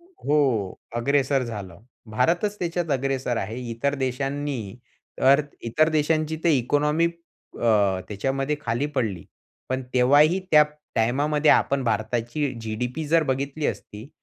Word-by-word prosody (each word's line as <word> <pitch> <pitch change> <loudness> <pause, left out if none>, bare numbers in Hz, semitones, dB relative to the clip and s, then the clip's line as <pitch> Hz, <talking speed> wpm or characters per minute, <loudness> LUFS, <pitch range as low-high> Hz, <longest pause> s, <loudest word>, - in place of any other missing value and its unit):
हो. 145 - -1 0.2
अग्रेसर 135 +2 +1
झालं. 100 -7 -7 0.3
भारतच 175 - +1
त्याच्यात 170 -2 -2
अग्रेसर 130 -2 -1
आहे. 110 +3 -3
इतर 140 +5 -1
देशांनी 135 -4 -3 0.5
तर 140 +2 +6 0.2
इतर 155 +7 +2
देशांची 155 0 0
तर 170 - +4
इकॉनॉमी 150 +4 +2
अ, 110 - -1
त्याच्यामध्ये 135 +7 -1
खाली 120 0 -1
पडली. 100 -10 -1 0.4
पण 130 0 -2
तेव्हाही 145 +8 +5
त्या 150 -1 +8 0.3
टाईमामध्ये 145 +6 +2
आपण 140 -1 +3
भारताची 120 +5 -1
जी-डी-पी 125 +7 -4
जर 165 +1 +4
बघितली 140 +2 -2
असती 105 +5 -6
135 Hz, 120 wpm, -24 LUFS, 115-150 Hz, 0.5 s, त्या